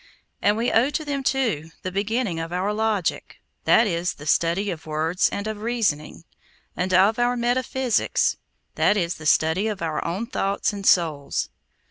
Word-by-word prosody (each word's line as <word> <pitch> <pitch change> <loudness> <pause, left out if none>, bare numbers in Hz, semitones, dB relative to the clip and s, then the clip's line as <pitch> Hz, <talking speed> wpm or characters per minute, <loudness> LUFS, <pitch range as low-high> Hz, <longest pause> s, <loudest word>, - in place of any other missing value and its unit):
And 205 +1 +3
we 235 +2 0
owe 240 +5 +3
to 310 +1 -3
them, 285 -1 -2
too, 235 - 0
the 185 - -3
beginning 205 -1 -1
of 165 +1 -5
our 185 +4 -1
logic—that 220 +1 0
is, 175 -2 -1
the 145 - -11
study 170 +6 +1
of 160 -2 -8
words 160 +3 +1
and 200 - -4
of 215 -1 -4
reasoning; 210 -11 -1 0.5
and 185 +1 -2
of 195 +5 +4
our 245 +1 +2
metaphysics—that 245 -3 0
is, 170 -2 -1
the 155 - -5
study 160 +8 +3
of 205 -5 -3
our 160 -2 -2
own 185 +7 -3
thoughts 200 -3 -1
and 200 -1 -4
souls. 155 -5 +2
200 Hz, 160 wpm, -23 LUFS, 170-230 Hz, 0.5 s, of